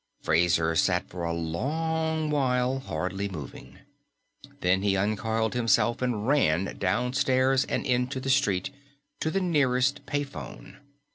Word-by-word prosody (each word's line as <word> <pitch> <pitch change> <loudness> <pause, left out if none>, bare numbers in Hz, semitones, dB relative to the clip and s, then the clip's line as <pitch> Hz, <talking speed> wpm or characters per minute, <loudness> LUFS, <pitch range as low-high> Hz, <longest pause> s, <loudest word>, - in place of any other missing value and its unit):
_ - - -23
Fraser 80 -1 +2
sat - - +2
for 90 -1 -7
a 85 - -1
long 155 - -1
while, 130 -2 +1
hardly 100 -5 -3
moving. 75 -8 -9 0.8
Then 90 +1 +2
he 100 -1 +1
uncoiled 110 +2 0
himself 120 0 +2
and 120 -4 -1
ran, 100 - +2
downstairs 130 +5 +2
and - - -2
into 125 0 0
the 135 +1 -1
street 100 -10 +1
and 140 - -25 0.4
to 160 - -1
the 195 +5 0
nearest 140 -5 +1
pay 145 0 0
phone. 140 - -10
125 Hz, 140 wpm, -27 LUFS, 95-140 Hz, 0.8 s, Fraser